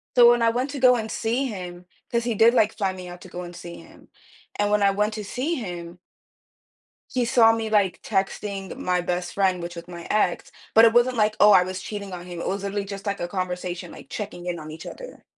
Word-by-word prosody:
So 240 Hz, -1 st, +8 dB
when 240 Hz, 0 st, +2 dB
I 230 Hz, -, +4 dB
went 250 Hz, +4 st, -1 dB
to 280 Hz, -, -5 dB
go 255 Hz, -1 st, +6 dB
and 220 Hz, -2 st, -3 dB
see 235 Hz, +4 st, -1 dB
him, 180 Hz, -6 st, -6 dB, 0.3 s
'cause 235 Hz, 0 st, +1 dB
he 235 Hz, -1 st, -1 dB
did, 225 Hz, +3 st, +6 dB
like, 220 Hz, -3 st, +2 dB
fly 195 Hz, -3 st, 0 dB
me 185 Hz, -1 st, -9 dB
out 175 Hz, 0 st, -10 dB
to -, -, -11 dB
go 180 Hz, 0 st, -7 dB
and 175 Hz, 0 st, -8 dB
see 170 Hz, 0 st, -9 dB
him. -, -, -16 dB, 0.5 s
And 205 Hz, 0 st, 0 dB
when 210 Hz, 0 st, +3 dB
I 200 Hz, 0 st, +5 dB
went 210 Hz, +2 st, 0 dB
to 215 Hz, -, -5 dB
see 275 Hz, -, -2 dB
him 175 Hz, -6 st, -6 dB, 1.1 s
he 255 Hz, -, +1 dB
saw 235 Hz, -2 st, +5 dB
me, 225 Hz, -1 st, -2 dB
like, 205 Hz, -4 st, +2 dB
texting 195 Hz, -1 st, -2 dB
my 180 Hz, 0 st, 0 dB
best 175 Hz, 0 st, -2 dB
friend, 190 Hz, -2 st, +1 dB
which 175 Hz, 0 st, -6 dB
was 170 Hz, -, -8 dB
my 170 Hz, -1 st, -9 dB
ex. 210 Hz, -4 st, 0 dB, 0.2 s
But 225 Hz, -, +8 dB
it 225 Hz, -, +6 dB
wasn't 240 Hz, +1 st, +4 dB
like, 215 Hz, -1 st, +1 dB
oh, 210 Hz, -, +8 dB
I 185 Hz, -3 st, +7 dB
was 185 Hz, 0 st, -5 dB
cheating 200 Hz, -1 st, -6 dB
on 180 Hz, -1 st, -7 dB
him. 175 Hz, -2 st, -7 dB
It -, -, -4 dB
was 195 Hz, +1 st, -2 dB
literally 200 Hz, 0 st, -2 dB
just 200 Hz, 0 st, -7 dB
like 200 Hz, -1 st, -2 dB
a 175 Hz, -, -1 dB
conversation, 180 Hz, -1 st, -4 dB
like, -, -, -13 dB
checking 200 Hz, -4 st, -6 dB
in 175 Hz, -1 st, -3 dB
on 155 Hz, 0 st, -8 dB
each 160 Hz, +1 st, -9 dB
other. -, -, -10 dB
200 Hz, 245 wpm, -24 LUFS, 180-225 Hz, 1.1 s, So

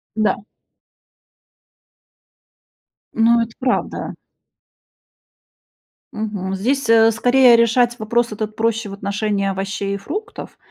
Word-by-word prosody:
Да. 215 Hz, -1 st, +1 dB, 2.7 s
Ну, 235 Hz, +1 st, +3 dB
это 230 Hz, 0 st, -3 dB
правда. 255 Hz, -1 st, -2 dB, 2.0 s
Мгм. 205 Hz, -3 st, -4 dB
Здесь, 245 Hz, +5 st, -1 dB
э, 225 Hz, 0 st, +6 dB
скорее, 245 Hz, +2 st, +5 dB
решать 240 Hz, +1 st, +2 dB
вопрос 235 Hz, +2 st, 0 dB
этот 215 Hz, 0 st, -5 dB
проще 225 Hz, -1 st, -1 dB
в -, -, -8 dB
отношении 200 Hz, 0 st, -2 dB
овощей 195 Hz, +1 st, -3 dB
и -, -, -4 dB
фруктов. 340 Hz, -, -7 dB
225 Hz, 95 wpm, -19 LUFS, 200-235 Hz, 2.7 s, э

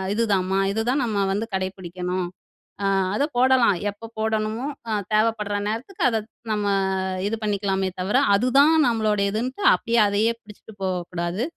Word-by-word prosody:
இதுதாம்மா. 195 Hz, -4 st, +1 dB
இதுதான் 245 Hz, +6 st, 0 dB
நம்ம 205 Hz, -4 st, 0 dB
வந்து 215 Hz, +3 st, -2 dB
கடைப்பிடிக்கணும். 185 Hz, -1 st, -3 dB, 0.5 s
அ -, -, +1 dB, 0.3 s
அத 275 Hz, -, +1 dB
போடலாம். 255 Hz, -5 st, +4 dB
எப்ப 205 Hz, +3 st, -9 dB
போடணுமோ, 220 Hz, +1 st, -1 dB, 0.3 s
ஆ -, -, -1 dB, 0.2 s
தேவைப்படுற 215 Hz, -1 st, +1 dB
நேரத்துக்கு 230 Hz, -, -5 dB
அத 225 Hz, -, 0 dB, 0.3 s
நம்ம 210 Hz, -1 st, -1 dB, 0.6 s
இது 220 Hz, -, -1 dB
பண்ணிக்கலாமே 195 Hz, -2 st, 0 dB
தவிர, 190 Hz, +5 st, -1 dB, 0.2 s
அதுதான் 270 Hz, +8 st, +4 dB
நம்மளுடையதுன்ட்டு 220 Hz, -, 0 dB
அப்படியே 235 Hz, 0 st, +1 dB
அதையே 205 Hz, +3 st, +2 dB
பிடிச்சுட்டு 210 Hz, +1 st, -14 dB
போகக்கூடாது, 180 Hz, +1 st, -2 dB
210 Hz, 125 wpm, -23 LUFS, 195-230 Hz, 0.6 s, போடலாம்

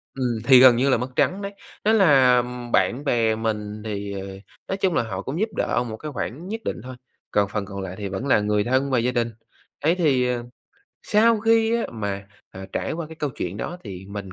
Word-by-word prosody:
Ừm, 125 Hz, -4 st, -1 dB
thì 130 Hz, 0 st, +8 dB
gần 130 Hz, -1 st, +8 dB
như 130 Hz, +4 st, +2 dB
là 130 Hz, -, +4 dB
mất 125 Hz, +3 st, -3 dB
trắng 195 Hz, +2 st, +1 dB
đấy. 200 Hz, 0 st, -5 dB, 0.3 s
Thế 220 Hz, -, +4 dB
là 135 Hz, -, +5 dB, 0.3 s
bạn 130 Hz, +4 st, +2 dB
bè 115 Hz, -5 st, +2 dB
mình 105 Hz, -1 st, -3 dB
thì, 100 Hz, -1 st, -4 dB
ờ, 95 Hz, 0 st, -5 dB, 0.4 s
nói 190 Hz, -, -2 dB
chung 190 Hz, -3 st, +1 dB
là -, -, +2 dB
họ 95 Hz, -4 st, -5 dB
cũng 135 Hz, -, -4 dB
giúp 220 Hz, +2 st, +1 dB
đỡ 120 Hz, -, +1 dB
một 110 Hz, -, -6 dB
cái 150 Hz, +3 st, -7 dB
khoản 145 Hz, +6 st, -5 dB
nhất 225 Hz, +3 st, -4 dB
định -, -, -3 dB
thôi, 130 Hz, 0 st, -8 dB, 0.4 s
còn 100 Hz, -1 st, +2 dB
phần 105 Hz, -2 st, -2 dB
còn 100 Hz, 0 st, -6 dB
lại 95 Hz, -1 st, -6 dB
thì 100 Hz, -, -4 dB
vẫn 95 Hz, +8 st, -4 dB
là 130 Hz, -, +4 dB
người 105 Hz, 0 st, +1 dB
thân 130 Hz, +4 st, +1 dB
và 125 Hz, -, +3 dB
gia 125 Hz, +2 st, +1 dB
đình. 120 Hz, -2 st, 0 dB, 0.5 s
Ấy 160 Hz, +4 st, +2 dB
thì, 140 Hz, -8 st, +2 dB
ờ, 120 Hz, -1 st, -1 dB, 0.6 s
sau 225 Hz, +1 st, +3 dB
khi 225 Hz, +1 st, +3 dB
á, 235 Hz, -, -1 dB
mà, 100 Hz, -3 st, -4 dB, 0.2 s
à, 95 Hz, 0 st, -9 dB
trải -, -, -2 dB
qua 165 Hz, -1 st, -4 dB
cái 160 Hz, -, -10 dB
câu 150 Hz, -3 st, -2 dB
chuyện 95 Hz, -4 st, -5 dB
đó 175 Hz, +10 st, -5 dB
thì 95 Hz, -2 st, -8 dB
mình 100 Hz, -2 st, -7 dB
125 Hz, 235 wpm, -23 LUFS, 105-155 Hz, 0.6 s, thì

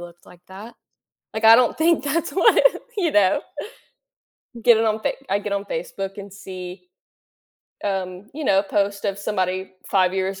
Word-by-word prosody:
looked 175 Hz, 0 st, -13 dB
like 180 Hz, -1 st, -17 dB
that." 210 Hz, +5 st, -11 dB, 0.6 s
Like, 220 Hz, -, -3 dB
I 225 Hz, +1 st, +10 dB
don't 250 Hz, +3 st, +2 dB
think 330 Hz, 0 st, +3 dB
that's 325 Hz, +3 st, -1 dB
what 375 Hz, -, +4 dB, 0.4 s
you 345 Hz, -6 st, 0 dB
know? 205 Hz, +9 st, +3 dB, 1.2 s
Get 235 Hz, -2 st, +6 dB
it 225 Hz, -, +1 dB
on 220 Hz, 0 st, 0 dB
Fa -, -, 0 dB, 0.2 s
I 200 Hz, +1 st, +1 dB
get 205 Hz, -, -5 dB
on 200 Hz, 0 st, -2 dB
Facebook 340 Hz, -, -5 dB
and 200 Hz, -1 st, -9 dB
see, 185 Hz, -, -9 dB, 1.0 s
um, 190 Hz, 0 st, -4 dB
you 310 Hz, -, -5 dB
know, 195 Hz, -5 st, +3 dB
post 200 Hz, 0 st, -1 dB
of 195 Hz, -1 st, -1 dB
somebody 190 Hz, -2 st, -2 dB, 0.2 s
5 185 Hz, -2 st, +2 dB
years 190 Hz, 0 st, -2 dB
200 Hz, 165 wpm, -22 LUFS, 190-225 Hz, 1.2 s, I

